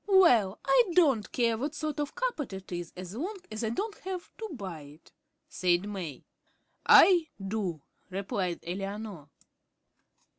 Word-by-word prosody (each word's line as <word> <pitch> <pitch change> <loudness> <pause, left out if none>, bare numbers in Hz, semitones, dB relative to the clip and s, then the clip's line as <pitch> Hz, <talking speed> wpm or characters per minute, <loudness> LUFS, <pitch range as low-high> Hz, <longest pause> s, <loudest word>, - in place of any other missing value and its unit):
"Well, 245 - +5
I - - +5
don't 275 - +3
care 230 -2 +1
what 290 +4 -3
sort 305 0 -3
of 290 -1 -1
a - - -21
carpet 400 - -2
it 190 0 -8
is 175 -1 -4
so 190 +6 -7
long 395 +7 -3
as 215 +2 -4
I 220 - 0
don't 410 - -2
have 370 -2 -6
to 440 -1 -5
buy 190 - -6
it," 145 +3 -15 0.4
said 180 +2 +1
May. 180 -10 -6 0.6
"I 350 -4 +8
do," 195 -6 -3 0.3
replied 190 -2 -2
Eleanor. 195 -3 -5
215 Hz, 150 wpm, -29 LUFS, 185-310 Hz, 0.6 s, I